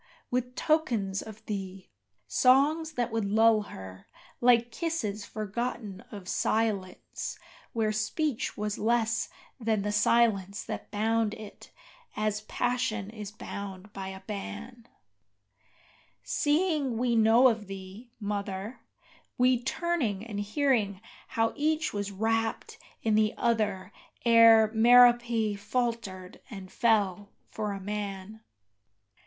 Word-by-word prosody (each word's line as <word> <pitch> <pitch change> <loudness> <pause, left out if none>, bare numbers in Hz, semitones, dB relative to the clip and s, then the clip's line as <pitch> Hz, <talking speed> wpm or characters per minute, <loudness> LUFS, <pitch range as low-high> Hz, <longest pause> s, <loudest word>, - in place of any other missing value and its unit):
with 250 0 -1
tokens 230 -12 0
of 220 0 -11
thee 195 -2 -5 0.4
Songs 295 +5 +3
that 240 -4 -1
would 225 -1 0
lull 220 +2 +4
her, 95 - -10 0.3
like 240 -1 +4
kisses 225 - -3
forgotten 215 -1 -4
of 200 -4 -9
silence 210 -4 -2 0.4
where 220 -2 +1
speech 225 +5 -2
was 210 0 -3
Less 230 0 +1 0.3
than 220 -3 0
the 210 - -1
silence 205 -2 +2
that - - -6
bound 220 +1 0
it 215 -2 -11 0.5
as 210 0 -1
passion 230 -2 -2
is 210 -3 -7
bound 200 -1 -8
by 195 -1 -6
a 190 0 -8
ban; 215 - -7 1.4
Seeing 295 -5 +1
we 240 0 +1
know 225 +3 +6
of 225 -4 0
thee, 195 +4 -9
Mother, 200 +1 -4 0.6
we 250 -1 +3
turning 260 - -1
and 210 -3 -5
hearing 210 -3 +1 0.3
how 225 0 0
each 310 +2 0
was 205 -1 -3
Wrapt 225 +3 -1 0.2
in 220 - +2
the 215 +1 +2
other 205 -5 0 0.3
ere 230 -2 +7
Merope 240 -2 +5
faltered 210 -5 -3
and 195 -5 -9
fell 205 -3 +1 0.2
for 210 -1 -3
a 195 - -5
man? 205 +1 -5
220 Hz, 115 wpm, -29 LUFS, 200-240 Hz, 1.4 s, ere